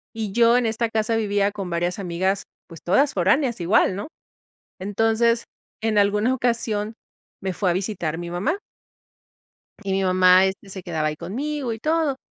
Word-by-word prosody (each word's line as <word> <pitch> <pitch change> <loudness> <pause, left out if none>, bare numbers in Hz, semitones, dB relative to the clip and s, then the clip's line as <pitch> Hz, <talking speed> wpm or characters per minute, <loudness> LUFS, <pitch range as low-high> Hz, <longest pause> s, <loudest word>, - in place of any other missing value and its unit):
Y 215 -3 -3
yo 235 +2 +5
en 245 - +1
esta 225 +1 0
casa 220 0 0
vivía 205 -2 +1
con 195 -3 -6
varias 175 +3 -1
amigas, 190 +2 -1 0.2
pues 165 -2 -12
todas 275 +11 +2
foráneas 225 - +1
igual, 185 +1 +3
¿no? 205 - -5 0.7
Entonces, 225 +4 +1 0.4
en 220 -2 +1
alguna 210 +4 +3
ocasión 225 -3 -1 0.5
me 190 -1 -2
fue 185 0 0
a - - +3
visitar 180 -4 -2
mi 175 0 -6
mamá 275 - -1 1.2
y 195 -1 -3
mi 190 0 +1
mamá, 185 0 +5
este, 195 +1 -4
se 190 -2 -8
quedaba 160 -3 -1
ahí 155 - -2
conmigo 265 - -3
y 220 - -8
todo. 310 -2 0
205 Hz, 165 wpm, -23 LUFS, 185-230 Hz, 1.2 s, yo